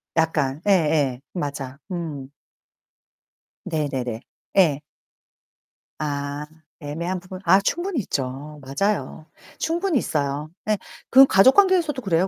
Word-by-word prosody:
약간. 150 -3 +1
예예 150 -9 +2
맞아. 140 -5 -4
음. 155 -7 -5 1.4
네네네. 135 -7 -2 0.4
예. 155 -7 +4 1.2
아 145 0 -3 0.3
애매한 170 +5 -3
부분 185 +1 -9
아 190 - +6
충분히 345 - -1
있죠. 145 -1 -4
맞아요. 155 +4 -2 0.3
충분히 340 0 0
있어요. 145 - -1 0.2
네 215 -1 +1 0.3
그건 270 0 +8
가족관계에서도 305 - +5
그래요 185 -3 +1
160 Hz, 220 characters per minute, -23 LUFS, 140-195 Hz, 1.4 s, 그건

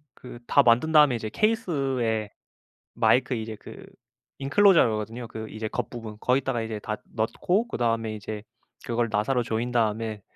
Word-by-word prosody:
그 120 -1 -11
다 140 - +5
만든 120 +7 +3
다음에 150 -5 +6
이제 110 -1 -4
케이스에 135 - 0 0.6
마이크 130 +1 +3
이제 110 -1 -5
그 - - -11 0.5
인클로저라고 145 - +4
하거든요. 115 +3 -5
그 110 -1 -7
이제 110 0 -5
겉부분 110 -3 -5
거기다가 125 -2 +1
이제 110 -1 -4
다 105 +1 -4 0.2
넣고 175 - 0
그다음에 115 - -1
이제 105 0 -7 0.4
그걸 120 0 0
나사로 120 +5 +1
조인 115 +2 -2
다음에 110 -2 -1
115 Hz, 350 characters per minute, -26 LUFS, 110-135 Hz, 0.6 s, 다음에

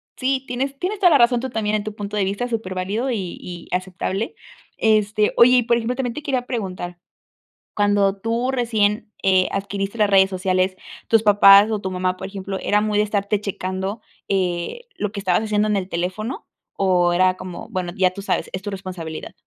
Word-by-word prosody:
sí, 265 0 -1
tienes 270 +3 -3
tienes 390 +3 -2
toda 365 - +6
la 300 - +6
razón 240 -1 +4
tú 260 - -4
también 215 -2 -1
en 210 - -1
tu 215 0 -5
punto 205 0 -5
de 205 - +1
vista, 200 +6 -2
superválido 210 +2 -2
y 190 -6 -4
y 175 -1 -8
aceptable. 190 +3 -3 0.4
Este, 215 -1 +2
oye, 250 +2 +7
y 245 - +3
por 235 +1 +2
ejemplo, 235 +2 -2
también 250 -2 -2
te 300 - -6
quería 260 -4 -1
preguntar, 185 -7 -4 0.8
cuando 205 -1 +2
tú 230 +4 -1
recién, 220 -4 0
eh 185 -1 +3
adquiriste 195 +1 -3
las 210 -2 +2
redes 190 -1 +6
sociales, 185 0 0 0.3
tus 225 -1 +4
papás 205 0 +7
o 215 - 0
tu 190 - -4
mamá, 185 0 -1
por 190 - -5
ejemplo, 195 -1 -5
¿era 210 0 +2
muy 210 -1 0
de 210 - +4
estarte 205 0 -1
checando, 190 +1 -4 0.3
eh, 185 - -1
lo 210 - -2
que 205 - -5
estabas 185 0 +1
haciendo 215 -1 +1
en 210 - +1
el 190 -2 -2
teléfono? 185 +9 -4 0.3
¿O 180 -2 +2
era 185 +1 +3
como, 185 -1 -8
bueno, 180 -2 -3
ya 185 -2 +3
tú 200 - -8
sabes, - - -1
es 185 - -3
tu 205 - -4
responsabilidad? 180 -5 -7
205 Hz, 195 wpm, -21 LUFS, 185-225 Hz, 0.8 s, oye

